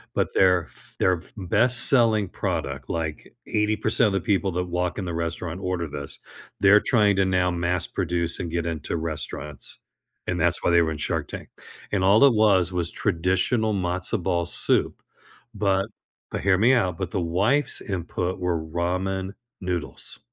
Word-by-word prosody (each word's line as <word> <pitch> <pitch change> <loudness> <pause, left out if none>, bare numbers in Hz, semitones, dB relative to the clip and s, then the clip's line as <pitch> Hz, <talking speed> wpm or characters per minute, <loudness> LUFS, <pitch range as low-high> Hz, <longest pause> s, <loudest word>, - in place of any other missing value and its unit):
but - - 0
their 90 -3 +4
f - - -9
their 90 -1 +3
f 80 - -14
best 120 +6 +2
selling 110 -7 +3
product, 75 -9 -4
like, 80 -2 -4
80% 105 0 +2
of 100 - -1
the 95 - 0
people 100 -3 0
that 90 +1 -1
walk 90 0 -2
in 100 - -3
the 85 - -4
restaurant 85 +1 -4
order 90 -3 -2
this, 70 -1 -5 0.4
they're 100 +1 +7
trying 105 -4 +2
to 95 - +3
now 90 -1 +1
mass-produce 85 -1 -1
and 85 - -3
get 85 0 -2
into 80 -3 -3
restaurants, 75 -3 -4 0.5
and 90 0 -1
that's 85 +2 +1
why - - +2
they 85 0 +5
were 80 -1 0
in 75 - -4
Shark - - -2
Tank, - - -8 0.4
and 95 -2 +1
all 100 +5 +6
it 140 -3 +7
was 100 -5 +3
was 90 -2 -1
traditional 95 +5 0
matzo 90 -1 -1
ball 85 -2 0
soup, 85 - 0 0.5
but 100 -1 +1 0.4
but- - - -3
hear 100 -2 +3
me 120 +5 +5
out- 95 -9 +1
but 95 - -3
the - - -1
wife's 100 - +1
input 90 -2 -3
were 90 -2 0
ramen 90 +4 -2 0.3
noodles. 90 -3 -5
90 Hz, 170 wpm, -24 LUFS, 85-100 Hz, 0.5 s, they're